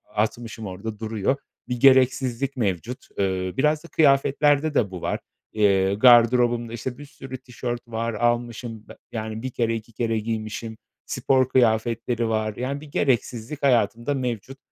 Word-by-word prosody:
atmışım, 110 +1 -2
orada 105 +3 -6
duruyor. 110 +2 0 0.3
Bir 125 -1 -3
gereksizlik 130 0 +3
mevcut. 115 +3 -2
Eee, 95 -2 -1
biraz 150 +3 +2
da - - -11
kıyafetlerde 145 0 +3
de 105 -9 +1
bu 90 -2 -7
var. - - -2 0.3
Eee, 100 -2 +3
gardırobumda, 120 +1 +5
işte, 120 +2 -5
bir 145 - -10
sürü 135 -2 -9
tişört 120 -1 -6
var. 115 0 -2
Almışım 120 -1 -2
be - - -12
yani, 110 0 -4
1 130 - -3
kere, 115 -2 0
2 115 +1 -8
kere 115 0 -1
giymişim. 110 0 -4 0.3
Spor 130 -1 +1
kıyafetleri 115 -1 +1
var, 110 -1 -1
yani, 135 +5 -3
bir 155 - -11
gereksizlik 125 +1 -1
hayatımda 120 +1 +2
mevcut. 125 -1 -4
120 Hz, 145 wpm, -24 LUFS, 110-130 Hz, 0.3 s, gardırobumda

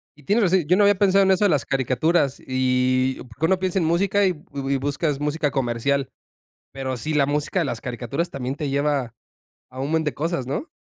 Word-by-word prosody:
Y 150 - -20
tienes 210 - +2
razón, 180 -3 +2
yo 180 - +4
no 210 - +4
había 205 -1 +4
pensado 195 0 +4
en 190 - +3
eso 190 +2 +3
de - - +4
las 150 -5 +1
caricaturas 135 +3 +1
y 130 0 +1
Porque 130 +8 -2
uno 185 +2 +2
piensa 185 0 0
en 165 - 0
música 195 +4 +2
y 190 - +4
y - - -1
bu 140 -2 -3
buscas 145 +1 -1
música 150 0 -1
comercial. 135 +1 -1 0.6
Pero 130 -1 -4
sí, 155 +7 -3
la 140 -2 +3
música 150 +5 -1
de - - +1
las 115 -3 -4
caricaturas 125 +8 -3
también 130 0 -4
te 150 -1 -4
lleva 140 -4 0 0.6
a 130 +1 -8
un 140 +3 -2
buen 160 -1 +1
de 150 - -2
cosas, 155 -4 -2
¿no? 145 - -3
145 Hz, 220 wpm, -23 LUFS, 130-170 Hz, 0.6 s, yo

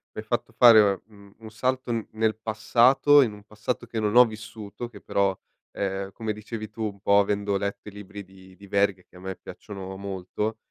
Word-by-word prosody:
mi - - -4
hai - - -14
fatto - - -2
fare 110 -5 +7
un 100 -1 -17
un 110 -1 -12
salto 130 +2 -1
n 115 -2 -2
nel 110 0 +1
passato, 120 +6 +4
in 115 -5 +1
un 105 0 -13
passato 110 +3 -4
che 115 -2 -4
non 105 +1 0
ho 125 0 +9
vissuto, 110 0 -8
che 105 -4 -13
però, 100 -1 0 0.4
ehm, 95 0 -3
come 110 -2 -3
dicevi 105 0 -7
tu, 110 - -9
un 100 -2 -5
po' 100 0 +4
avendo 100 0 0
letto 100 +1 -3
i - - -13
libri 100 0 -9
di 95 0 -17
di 100 - -15
Verga 100 -2 +1
che - - -26
a - - -12
me 95 +1 -6
piacciono 95 -1 -9
molto, 100 +3 -4
105 Hz, 205 wpm, -25 LUFS, 100-110 Hz, 0.4 s, ho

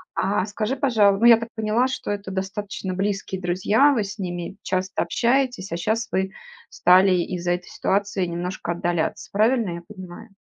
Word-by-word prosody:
А, 200 -1 0
скажи, 215 +4 -2
пожалу 215 -7 +3
Ну, 230 - +3
я 235 -1 +9
так 230 0 -6
поняла, 220 +3 +1
что 255 -3 -4
это 200 -1 -4
достаточно 195 0 -4
близкие 195 -1 -2
друзья, 190 +10 +3
вы 220 -5 +1
с 205 +2 -8
ними 175 -1 -4
часто 185 +1 -1
общаетесь, 245 -6 0
а - - -1
щас 220 +6 -1
вы 190 0 0 0.4
стали 185 +2 +5
из-за 175 0 -1
этой 180 0 -2
ситуации 200 -1 -1
немножко 175 +1 -4
отдаляться, 175 -1 -2
правильно 220 0 +2
я 170 - -7
понимаю? 185 +1 -11
195 Hz, 165 wpm, -23 LUFS, 180-220 Hz, 0.4 s, я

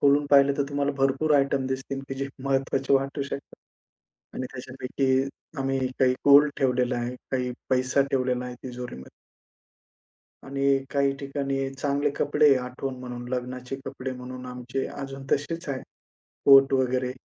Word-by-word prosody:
खोलून 145 +1 +4
पाहिलं 140 0 +6
तर 140 - +4
तुम्हाला 145 0 0
भरपूर 135 +3 +2
आयटम 140 -1 +1
दिसतील, 135 +1 -3
की 135 - -3
जे 135 +1 -3 0.2
महत्वाचे 135 0 0
वाटू 135 +1 0
शकतात. 140 0 -7 0.8
आणि 130 - -3
त्याच्यापैकी 130 +1 -1 0.4
आम्ही 135 0 0 0.2
काही 130 -1 +4
गोल्ड 145 +1 +8
ठेवलेलं 125 -1 +1
आहे, 120 +1 -3 0.2
काही 125 -1 0 0.2
पैसा 130 +2 +3
ठेवलेला 125 -2 0
आहे 125 0 -6
तिजोरीमध्ये. 125 - -7 1.3
आणि 140 0 +2
काही 140 0 +2
ठिकाणी 135 -1 -2
चांगले 145 +1 0
कपडे 145 0 +4
आठवण 130 +1 -4
म्हणून 125 -1 -7
लग्नाचे 125 +1 -4
कपडे 130 0 -5
म्हणून 125 0 -8
आमचे 125 +1 -4
अजून 135 -1 -7
तसेच 160 +3 -1
आहे. 135 -2 -3 0.6
कोट 135 0 +8
वगैरे. 130 -1 +1
135 Hz, 140 wpm, -26 LUFS, 125-140 Hz, 1.3 s, गोल्ड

